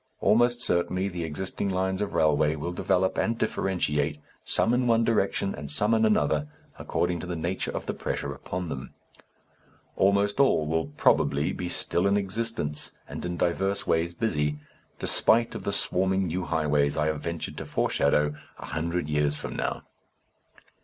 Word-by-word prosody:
Almost 120 +2 +3
certainly 90 -1 +1
the 90 -2 -4
existing 95 +5 -3
lines 95 +1 -1
of 105 - -3
railway 75 0 +3
will 80 +3 -4
develop 95 +1 +1
and 115 0 0
differentiate, 75 -9 0 0.3
some 115 - +2
in 125 0 +2
one 115 -1 +4
direction 100 -3 +1
and 70 -1 -7
some 105 +9 +2
in 110 0 +4
another, 75 -7 +2 0.3
according 85 0 -1
to 90 - -6
the 90 - -3
nature 85 +3 -2
of - - -4
the - - -2
pressure - - -3
upon 90 -1 -5
them. 65 -2 -6 1.0
Almost 100 +3 +2
all 135 - +4
will 80 +1 0
probably 70 +2 +2
be 90 -1 -4
still 90 +1 0
in 100 +1 +3
existence 100 -6 -2
and - - -7
in 90 0 -4
divers 95 +4 0
ways 85 +1 0
busy, 75 -8 0 0.4
spite 115 +1 +3
of - - -7
the - - 0
swarming 95 +1 +1
new 90 +1 -2
highways 75 -3 +1
I 75 - +2
have 75 -1 -1
ventured 85 0 -4
to - - -5
foreshadow, 75 +1 +1 0.2
a - - -8
hundred 85 0 -2
years 75 0 +1
from - - -6
now. - - -2
90 Hz, 165 wpm, -27 LUFS, 75-100 Hz, 1.0 s, one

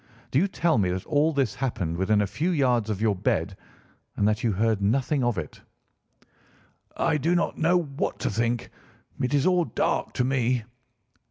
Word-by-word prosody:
Do 135 - +3
you 190 - +2
tell 170 - +1
me 95 -3 +1
that 90 +1 -3
all 150 +2 +2
this 140 -5 0
happened 115 -11 -2
within 105 +3 +2
a - - +2
few 150 - -2
yards 125 - +1
of 105 0 -2
your 105 -3 +2
bed 90 - -1 0.6
and 105 - +2
that 105 +2 0
you 115 - +2
heard 110 +1 +1
nothing 130 +6 +1
of 120 -2 0
it?" - - -6 1.4
"I - - +2
do 165 +6 +1
not 175 - -1
know 170 +3 +3
what 145 -5 -2
to - - 0
think. 115 +2 -1 0.5
It 125 - 0
is 140 - +2
all 180 -2 +3
dark 115 - -1
to - - 0
me." 125 -2 +1
125 Hz, 185 wpm, -26 LUFS, 110-150 Hz, 1.4 s, Do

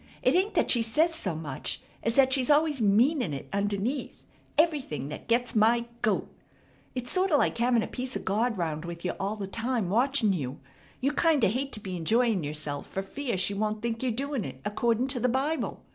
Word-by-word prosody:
It - - +4
ain't 385 +3 +2
that - - +3
she 240 - +4
says 310 +9 +2
so 190 - -2
much 150 -4 -4 0.2
as 230 0 0
that 265 -1 +5
she's 260 -1 +2
always 295 -2 +3
meanin' 220 - +3
it 135 - -7
underneath, 205 +7 -2 0.3
everything, 285 - +1
that 150 - -8
gets 235 +1 +1
my 230 +2 +4 0.2
goat! 215 -2 +1 0.7
It's 250 -1 -3
sorta 370 -4 +3
like 255 - +1
having 240 -1 +3
a - - -4
piece 255 0 -5
of - - -4
God 220 +3 +1
round 160 -3 -2
with 170 +1 -7
you 180 - +1
all 200 +2 -1
the 205 -2 -4
time 230 -1 -1
watching 240 -2 +3
you. 140 -6 -4 0.4
You 275 +3 +1
kinda 295 - +3
hate 265 +6 -2
to 215 - -3
be 190 -3 -5
enjoyin' 220 +3 +2
yerself 145 -1 -4
fer 195 - -3
fear 240 +2 -3
she 185 +2 0
won't 215 +1 -2
think 230 -1 -2
yer 260 - 0
doin' 270 +1 -2
it 130 -3 -7
accordin' 230 +3 +1
to 260 -2 -1
the 250 +2 +2
Bible." 275 +6 -1
230 Hz, 205 wpm, -28 LUFS, 195-265 Hz, 0.7 s, that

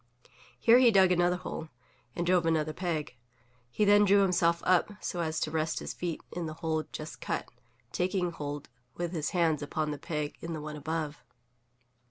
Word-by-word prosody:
Here 235 +2 +6
he 255 -2 +7
dug 190 -4 +5
another 175 0 +3
hole, 160 -3 -6 0.5
and 175 - -1
drove 175 -1 +3
another 155 -1 +1
peg. 155 -6 -3 0.5
He 210 - +1
then 205 0 +6
drew 200 0 +5
himself 170 -2 +2
up, 185 +3 +3
so 175 - -4
as 160 -2 -1
to 155 - -1
rest 155 0 -1
his - - -4
feet 175 -2 -4
in 175 -1 -4
the 155 - -6
hole 160 -1 -1
just 155 +1 -7
cut, - - -2 0.4
taking 180 -1 0
hold 145 -2 -5 0.3
with 175 -1 -3
his 155 -4 -2
hands 165 -4 +1
upon 150 +1 -2
the 145 - -5
peg 150 -2 -4
in 165 0 -4
the 155 - -4
one 150 0 -6
above. 155 0 -4
165 Hz, 185 wpm, -30 LUFS, 155-180 Hz, 0.5 s, he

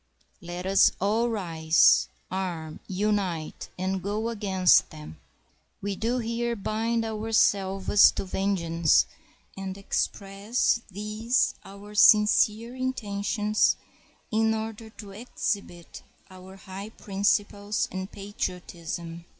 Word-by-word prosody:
Let 175 +1 -6
us 195 +1 +5
all 220 +5 +1
rise, 165 -6 +3 0.2
arm, 175 -5 -4
unite, 190 -5 -2
and 190 +1 -2
go 210 +4 -2
against 195 -5 +3
them. 150 - -11 0.6
We 200 0 -3
do 230 +5 -1
here 235 0 -2
bind 225 +2 -1
ourselves 205 -3 +3
to - - -4
vengeance, 170 - +2 0.5
and 195 0 -6
express 200 +4 -1
these 215 +5 0
our 200 +1 -12
sincere 215 +2 +4
intentions 210 -4 0 0.6
in 220 0 +2
order 220 0 -6
to 210 -2 -11
exhibit 200 -5 -5 0.3
our 185 +1 -12
high 195 +2 -8
principles 205 +1 -1
and 190 +1 -5
patriotism. 175 -4 -6
200 Hz, 100 wpm, -26 LUFS, 185-220 Hz, 0.6 s, us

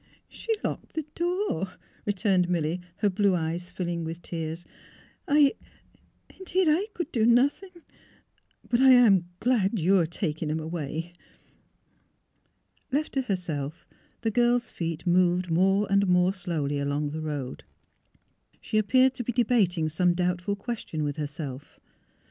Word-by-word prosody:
She 460 - -6
locked - - -4
the 315 -2 -3
door," 345 - -1 0.3
returned 190 -3 +2
Milly, 170 0 -1 0.2
her 205 - +2
blue 200 0 +2
eyes 170 +2 -3
filling 175 -2 -3
with 165 +1 -6
tears. 165 0 -5 0.2
' - - -25
' - - -35
I 290 -1 +5 0.4
— - - -26
indeed, 375 0 +1
I 330 +7 +2
could 345 - -4
do 225 - +1
nothing. 265 - +3 1.0
But 240 - +1
I 265 -1 +8
am 200 -8 +5
glad 230 -4 +1
you 190 +2 +3
are 165 - +1
taking 160 -2 -3
him 155 +1 -1
away." 160 +1 -5 1.8
Left 295 +3 -1
to 270 - +1
herself, 170 - -4 0.3
the 225 - 0
girl's 240 +1 +2
feet 165 -1 -4
moved 180 0 +2
more 195 +4 +3
and 200 0 +3
more 180 +1 +3
slowly 160 -7 -2
along 145 +1 -1
the 155 +1 -4
road. 145 -4 -5 1.0
She 215 - 0
appeared 255 +5 +4
to 250 - -5
be 245 - -2
debating 205 -9 +2
some 175 +3 +1
doubtful 180 +2 -1
question 200 -7 -4
with 145 0 -3
herself. 145 -2 -6
180 Hz, 145 wpm, -27 LUFS, 160-235 Hz, 1.8 s, I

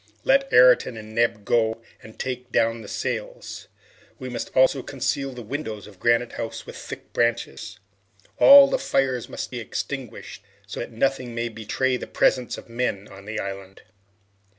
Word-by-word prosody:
Let 275 0 +3
Ayrton 125 -1 +6
and 110 0 -10
Neb 115 -2 +1
go 115 0 +1 0.2
and 110 - -14
take 125 -1 -5
down 115 0 +1
the 105 - -10
sails. - - -5 0.5
We 130 - -7
must 120 - -4
also 130 +1 +5
conceal 135 +1 -2
the 125 -2 -8
windows 110 -4 -5
of 100 -3 -15
Granite 120 0 +2
House 115 - -6
with - - -10
thick - - -9
branches. 115 -2 -1 0.6
All 280 0 +10
the - - 0
fires 130 - 0
must - - -5
be 125 - -4
extinguished, 120 -1 -6 0.2
so - - -7
that 120 - -5
nothing 125 0 -1
may 120 0 -1
betray 115 +4 -1
the - - -7
presence 125 -2 +1
of - - -11
men 115 -4 -2
on 100 0 -13
the 110 +1 -4
island." 95 -1 -7
120 Hz, 165 wpm, -24 LUFS, 110-130 Hz, 0.6 s, All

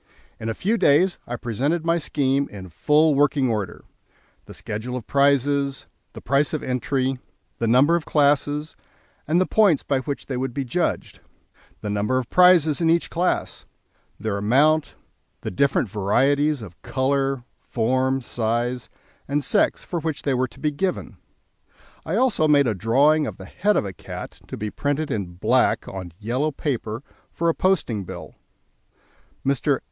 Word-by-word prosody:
In 110 - -4
a 115 - -2
few 220 +5 0
days 175 +6 +3
I 120 - -3
presented 140 +9 -1
my 170 +1 +2
scheme 140 -2 0
in 95 -3 -9
full 150 - +3
working 140 -2 +2
order: 105 -5 -3 0.6
the - - -11
schedule 110 +4 -5
of 125 - -5
prizes, 140 0 +1 0.3
the - - -9
price 140 +5 +1
of 155 - -2
entry, 130 +1 -1 0.4
the 115 - 0
number 135 +8 +5
of 170 - -1
classes, 145 +1 +1 0.5
and 165 +4 +3
the 185 - +3
points 195 -10 +3
by 140 -2 0
which 140 +1 -5
they 130 - -4
would 130 -1 -3
be 140 - -2
judged, 165 +8 -2 0.6
the 105 - -4
number 105 +5 0
of 130 -2 -3
prizes 175 -4 +5
in 165 - +3
each 170 +1 +1
class, 180 +2 -1 0.5
their 105 -2 -2
amount, 145 +9 +2 0.5
the - - -4
different 135 +4 +1
varieties 130 +8 +1
of 90 -5 -12
colour, 135 -1 0 0.2
form, 130 +3 0
size, 120 +1 -2 0.4
and 145 +1 0
sex - - +1
for 175 - -3
which 160 -2 -3
they 140 - +1
were 130 0 +1
to 115 - -18
be 150 - 0
given; 185 +6 -3 0.9
I - - -1
also 230 -12 +2
made 145 -2 +5
a 115 - +1
drawing 140 - +3
of - - -6
the - - -10
head 210 +2 0
of - - 0
a 95 - -5
cat - - -9
to - - -7
be 105 0 -4
printed 145 +1 -2
in 95 -7 -3
black 90 - +2
on 95 -3 -7
yellow 120 +8 -1
paper 125 -5 -3 0.3
for 170 0 -1
a - - +2
posting 160 - 0
bill. - - -9 1.1
Mr. 135 0 +1
140 Hz, 165 wpm, -23 LUFS, 120-150 Hz, 1.1 s, number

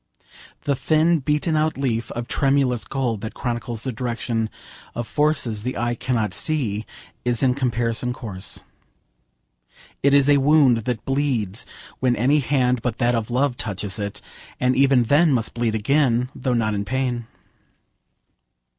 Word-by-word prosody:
The 140 - +1
thin 160 +4 +2
beaten 150 +3 0
out 155 -1 +1
leaf 120 -4 -1
of 120 0 -5
tremulous 135 -5 +1
gold 125 -6 -2
that 110 - -6
chronicles 120 -1 -3
the 130 - -2
direction 115 -1 -2 0.5
of 120 -1 -3
forces 145 -8 +1
the 125 +4 -3
eye 120 +1 0
cannot 115 -5 -1
see 115 -9 0 0.4
is 120 +1 +2
in 130 -1 +4
comparison 120 -2 -1
coarse. 105 -7 -5 1.4
It 140 0 +4
is 140 -1 +5
a 145 -1 +6
wound 140 -3 +5
that 120 -3 -3
bleeds 130 -7 0 0.3
when 125 -1 +2
any 135 +7 +3
hand 125 -3 +1
but 120 -2 -2
that 120 +1 +2
of 115 -1 -1
love 125 +1 +1
touches 100 -1 -3
it, 100 -1 -4 0.4
and 125 0 +2
even 135 -2 +4
then 145 +7 +4
must 115 -3 0
bleed 115 -2 -1
again, 125 +1 +2
though 130 -2 -1
not 110 -2 +1
in 100 -1 -1
pain. 125 0 -2
125 Hz, 150 wpm, -22 LUFS, 115-140 Hz, 1.4 s, a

